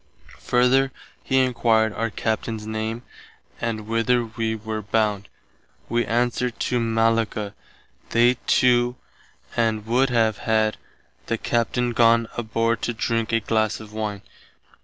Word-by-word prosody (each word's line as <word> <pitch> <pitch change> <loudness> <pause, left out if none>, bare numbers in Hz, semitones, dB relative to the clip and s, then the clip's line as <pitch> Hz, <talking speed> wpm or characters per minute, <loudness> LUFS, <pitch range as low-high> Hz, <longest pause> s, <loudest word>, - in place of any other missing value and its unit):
Further 130 +2 +3 0.3
he 130 - +1
enquired 115 -4 +2
our 115 +1 -2
Captain's 110 +1 -3
name 110 +2 -3 0.6
and 110 -2 -3
whither 115 +2 +1
wee 110 0 -2
were 110 0 -4
bound. 105 -1 0 0.6
Wee 120 -2 0
answered 120 +2 0
to 125 - 0
Mallacca. 115 -2 0 0.6
They 120 +2 +4
too 125 -1 +3 0.6
and 110 -2 0
[would 125 +4 +2
have] 110 -3 +2
had 110 -1 +1 0.5
the 115 - 0
Captain 120 +1 0
gone 115 0 +4
aboard 115 0 0
to 120 - -2
drink 115 0 -1
a 115 0 +2
glass 110 0 0
of 110 -1 -12
wine. 105 -2 -4
115 Hz, 125 wpm, -23 LUFS, 110-120 Hz, 0.6 s, They